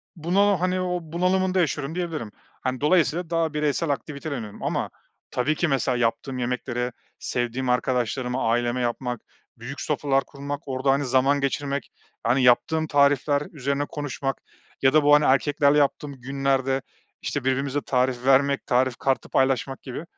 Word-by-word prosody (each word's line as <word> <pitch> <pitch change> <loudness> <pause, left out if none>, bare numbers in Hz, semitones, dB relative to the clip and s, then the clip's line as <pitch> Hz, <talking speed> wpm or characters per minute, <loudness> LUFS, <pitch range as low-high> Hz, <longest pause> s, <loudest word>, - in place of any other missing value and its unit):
bunalı, 195 +5 +2
hani, 185 +1 0
o 180 -1 -1
bunalımında 185 +3 +1
yaşıyorum 155 -2 -1
diyebilirim. 165 -11 -3 0.3
Hani, 130 0 -2
dolayısıyla 170 +1 +2
daha 165 -2 0
bireysel 150 +2 0
aktivite 145 +1 -4
deniyorum. 110 -7 -6
Ama - - -1 0.4
tabii 145 +5 0
ki 175 - +1
mesela 130 -3 +1
yaptığım 120 +3 -1
yemekleri 125 0 -2 0.3
sevdiğim 125 +1 -2
arkadaşlarıma 125 0 0
aileme 120 +1 0
yapmak, 120 0 -2 0.4
büyük 130 +4 -7
sofralar 140 -2 +1
kurmak 140 +1 -6
orada, 135 0 +1
hani, 140 +1 +1
zaman 135 +3 +3
geçirmek, 140 0 -2 0.4
yani, 130 +2 +3
yaptığım 155 +6 +3
tarifler 145 0 +3
üzerine 140 0 -1
konuşmak 135 -2 -4 0.4
ya 135 0 +4
da 155 -1 +5
bu, 145 0 +5
hani, 150 0 +3
erkeklerle 140 +2 +3
yaptığım 145 0 0
günlerde 135 0 0 0.4
işte 145 - -3
birbirimize 135 +2 0
tarif 125 -2 0
vermek 140 +1 +3
tarif 125 0 +2
kartı 135 -1 -1
paylaşmak 135 0 +1
gibi. 130 +3 -6
140 Hz, 145 wpm, -24 LUFS, 130-150 Hz, 0.4 s, da